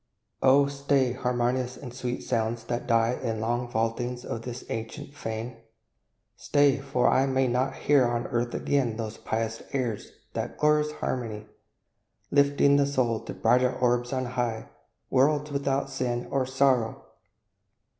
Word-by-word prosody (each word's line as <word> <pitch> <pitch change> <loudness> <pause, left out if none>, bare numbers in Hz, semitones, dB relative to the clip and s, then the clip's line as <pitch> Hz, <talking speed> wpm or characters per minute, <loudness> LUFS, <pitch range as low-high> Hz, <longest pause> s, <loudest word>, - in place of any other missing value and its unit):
Oh, 135 +2 +6
stay, 140 -2 +1
harmonious 125 0 -1
and 125 -4 -9
sweet 125 -1 -4
sounds, 115 -1 -1
that 120 +1 -3
die 115 0 +3
In 115 - -1
the 110 - -5
long 120 +2 -1
vaultings 120 +2 -2
of 115 - -4
this 125 +1 -7
ancient 115 +5 -5
fane! 115 -2 -5 0.8
Stay, 145 -1 +3
for 135 -2 +1
I 135 +1 +3
may 130 0 +2
not 130 +2 0
hear 140 -3 +3
on 120 0 -1
earth 120 0 -1
again 125 -6 0
Those 110 -1 -5
pious 115 0 -2
airs 120 -6 -2 0.2
that - - -4
glorious 150 0 +3
harmony; 110 -7 -4 0.9
Lifting 140 0 +4
the 140 -1 +3
soul 125 -5 +1
to - - -5
brighter 125 +2 +3
orbs 120 -1 +1
on 130 -1 -1
high, 120 -2 -3 0.4
Worlds 145 +3 +2
without 140 -1 -1
sin 125 -2 -2
or 135 -2 +1
sorrow! 130 -4 +1
125 Hz, 145 wpm, -27 LUFS, 115-135 Hz, 0.9 s, Oh